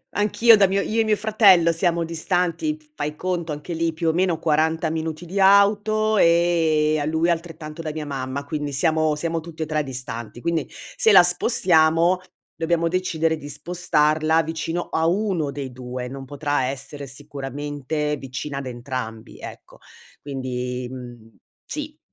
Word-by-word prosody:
anch'io 220 +2 +5
da 195 -2 +4
mio 195 +1 +1
io 225 +3 0
e 225 - +3
mio 215 -1 +2
fratello 200 -7 +5
siamo 170 0 +1
distanti, 180 - -1
f 300 - -25
fai 150 - -4
conto 175 -3 -2
anche 150 +4 -5
lì, 165 0 0
più 165 +1 -4
o - - +1
meno, 175 -1 +1
40 160 +1 +1
minuti 160 +1 -4
di 195 +4 -2
auto, 210 +2 +4
ehm, 165 -3 +3
a 145 - -1
lui 160 +2 +1
altrettanto 165 -2 -4
da 155 - -4
mia 155 -1 -5
mamma. 135 0 -4
Quindi, 150 -1 -3
siamo 155 +1 +1
siamo 165 +1 -2
tutti 160 -1 -8
e - - -10
3 155 0 0
distanti, 125 -4 -6
quindi, 165 0 0
se 220 - -1
la 180 -3 +8
spostiamo, 175 -3 +3 0.3
dobbiamo 165 +1 0
decidere 165 -2 0
di 145 -1 -9
spostarla 155 0 +1
vicino 165 +2 -3
a 160 0 +1
uno 180 -5 0
dei 135 -2 -6
2, 125 0 -6
non 135 +1 -7
potrà 145 -1 -1
essere 135 +1 -5
sicuramente, 145 +2 -4
vicina 135 +2 -6
ad 135 - -6
entrambi, 120 -3 -6
ecco. - - -11 0.4
Quindi, 125 -2 -4
mhmm, 120 -4 -11 0.3
sì, - - -6
160 Hz, 160 wpm, -23 LUFS, 140-175 Hz, 0.4 s, la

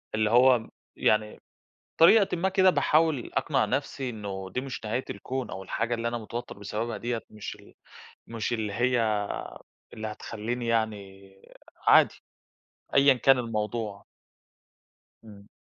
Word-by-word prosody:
اللي 110 -1 +1
هو 125 -1 +4 0.3
يعني، 105 0 +1 0.6
بطريقةً 190 +2 +6
ما 185 +3 +1
كده، 190 -1 +4
باحاول 155 -6 +2
أقنع - - +1
نفْسِي 130 -2 -2
إنه 100 -4 -6
دي 125 - 0
مش 130 -3 -7
نهاية 115 +5 -2
الكون، 130 +6 -4
أو 95 - -6
الحاجة 115 +5 -2
اللي 115 0 -2
أنا 120 0 -3
متوتر 115 0 -7
بسببها 105 +3 -4
ديّة، 120 -1 -3
مش 105 -2 -7
ال - - -19 0.5
مش 115 +1 -3
اللي 110 -3 -2
هي 115 -3 +1 0.7
اللي 110 0 -5
هتخلّيني 115 +3 -5
يعني 100 -4 -2 0.6
عادي - - +6 0.8
أيًا 140 0 +7
كان 130 +1 +4
الموضوع. 110 -2 -3 1.2
إمم. 100 -2 -14
115 Hz, 130 wpm, -27 LUFS, 105-125 Hz, 1.2 s, أيًا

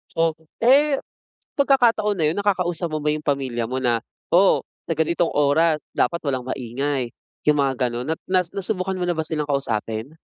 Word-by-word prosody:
So, 165 -1 +2 0.2
eh, 275 +4 +4 0.6
pagkakataon 235 -8 +3
na 160 - +1
yun, 155 - +1
nakakausap 180 -4 0
mo 155 - -1
ba 150 0 0
yung 150 - -5
pamilya 130 -5 -1
mo 130 - -1
na, 120 -3 +1 0.3
"Oh, 190 +2 +4 0.2
sa 165 - -3
ganitong 170 +1 +1
oras 150 +2 +3 0.2
dapat 170 - +1
walang 130 -2 0
maingay." 130 0 -2 0.3
Yung 150 -1 +4
mga 130 -2 +1
ganun 120 +2 -4
na 160 - -1
na 185 -1 +3
nasubukan 190 -1 -2
mo 180 - -1
na 175 - +1
ba 160 - -1
silang 155 -2 -2
kausapin? 125 -1 -2
155 Hz, 175 wpm, -22 LUFS, 135-185 Hz, 0.6 s, eh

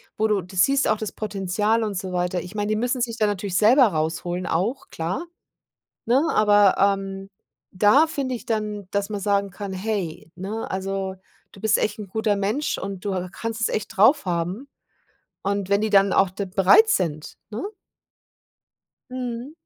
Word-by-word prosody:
wo 220 - +1
du 210 -2 +1
du 185 +2 -13
siehst 275 +9 +3
auch 215 - +2
das 215 -1 -4
Potenzial 210 +2 -1
und 210 -2 -3
so 185 0 -4
weiter, 180 0 -1
ich 180 +4 -10
meine, 205 -1 -2
die 215 - +1
müssen 245 +3 -1
sich 235 -1 -2
dann 215 -2 +2
natürlich 195 -2 -2
selber 245 +4 +6
rausholen 170 +2 -2
auch, 220 +11 -1
klar, 175 - -3 0.8
ne, 250 +5 +3
aber, 205 -2 +4
ähm, 195 0 0 0.5
da 240 - +5
finde 270 -4 -3
ich - - -12
dann, 210 -3 -2
dass 200 0 0
man 210 -1 -3
sagen 200 0 +1
kann: 200 +1 -6
„Hey, 190 -5 -4
ne, 200 +5 -5
also 190 0 -3 0.4
du 195 - -14
bist 220 0 +3
echt 210 0 -1
'n 210 - -6
guter 215 +1 0
Mensch“, 210 +9 -1
und 195 -1 -6
du 200 -2 -1
ha 185 0 -3
kannst 225 +1 -5
es - - +3
echt 215 +1 -4
drauf 220 +5 +5
haben 180 +9 -2 0.7
und 200 -1 -1
wenn 200 0 +3
die 220 - 0
dann 195 -1 +5
da - - 0
auch 195 -1 +4
de 195 +2 -4
bereit 195 - +5
sind, 155 - -1
ne? 215 - -5 1.5
Mhm. 250 +1 -5
205 Hz, 185 wpm, -23 LUFS, 190-220 Hz, 1.5 s, selber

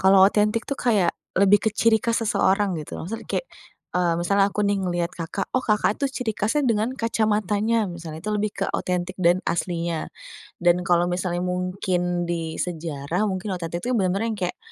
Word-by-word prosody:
Kalau 190 0 +7
otentik 210 +3 +1
tuh 280 - -3
kayak 205 -8 +2 0.2
lebih 200 +2 +5
ke - - -3
ciri 220 +1 +4
khas 230 -1 +1
seseorang 195 -2 +2
gitu, 150 - -7
maksudnya 220 +6 -6
kek, - - -1 0.5
eee, 175 -2 +2
misalnya 200 +3 +3
aku 210 - -2
nih 200 - +2
ngeliat 175 -1 -1
Kakak, 175 +3 -4
oh 255 - +1
Kakak 210 -1 +2
itu 280 - +2
ciri 225 -3 0
khasnya 230 +9 +1
dengan 225 +2 +1
kacamatanya, 215 -1 +1
misalnya 165 -2 -7
itu 215 - -1
lebih 210 0 0
ke - - -1
otentik 180 0 -2
dan 175 +1 +4
aslinya. 170 -2 -2 0.5
Dan 175 0 +3
kalau 175 0 +4
misalnya 175 -1 -1
mungkin 180 -1 -1
di 165 -2 -2
sejarah, 165 +1 -2
mungkin 190 +2 -3
otentik 170 -1 -4
itu 250 - -1
yang 230 - +2
bener-bener 195 +3 +1
yang 215 - -4
kayak, 180 -1 -2
190 Hz, 185 wpm, -24 LUFS, 175-215 Hz, 0.5 s, Kalau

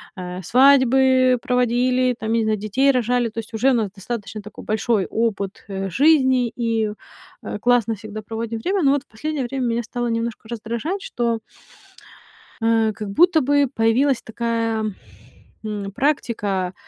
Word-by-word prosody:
э, 180 0 -6
свадьбы 260 +2 +4
проводили, 250 +1 +1
там, 220 -1 -4
я - - +2
не - - +1
знаю, 215 0 +1
детей 215 +7 +1
рожали. 245 -1 +1
То 225 - -6
есть 225 +1 -17
уже 245 +5 +3
у - - +2
нас 220 -5 0
достаточно 210 +1 -6
такой 210 +1 -11
большой 215 -2 0
опыт, 215 -3 -2
э, 195 -1 -4
жизни, 260 - +4
и, 225 -3 0 0.5
э, - - -5
классно 235 -1 +2
всегда 215 +1 -8
проводим 225 +1 -5
время. 380 - 0
Но 275 - +5
вот 280 -1 0
в - - -51
последнее 295 +5 -4
время 260 +1 -3
меня 235 0 0
стало 240 +1 -3
немножко 230 -1 -3
раздражать, 235 - -4
что 235 -1 -1 1.2
а, 225 -1 +2
как 210 -1 -6
будто 340 - +4
бы 285 0 +2
появилась 245 +3 +2
такая, 230 -1 -2 0.8
м, 205 -2 -4
практика, 205 -8 -1
230 Hz, 155 wpm, -21 LUFS, 215-255 Hz, 1.2 s, Но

